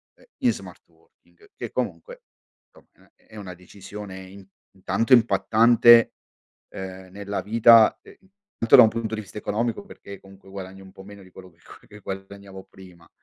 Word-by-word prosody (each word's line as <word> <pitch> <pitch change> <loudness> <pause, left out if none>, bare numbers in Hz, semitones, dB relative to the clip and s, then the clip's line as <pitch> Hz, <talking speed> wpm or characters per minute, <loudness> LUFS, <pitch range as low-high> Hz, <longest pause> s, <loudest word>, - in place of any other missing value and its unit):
uhm, - - -25 0.2
in - - +2
smart - - -11
working, 415 -1 -28
che - - -8
comunque, - - -6 0.4
insomma, - - -26
è - - -34
è 110 - -16
una 95 -3 -9
decisione 95 +2 -12
in 95 +1 -15 0.3
intanto 100 +7 -1
impattante, 115 +1 +4 0.6
uhm, 95 0 -9
nella 100 0 -6
vita, 115 +1 +5
ehm, - - -17 0.4
intanto 115 - +4
da - - +9
un 110 - +4
punto 115 -1 -5
di 110 - -6
vista 100 - -13
economico, 115 - -3
perché 100 - -13
comunque 95 0 -19
guadagni 95 0 -10
un 95 -1 -15
po' 95 0 -15
meno 100 0 -14
di 95 - -18
quello 95 +1 -14
che 85 - -33 0.3
che 105 - -15
guadagnavo 95 0 -10
prima, 90 -3 -18
100 Hz, 170 wpm, -23 LUFS, 95-110 Hz, 0.6 s, da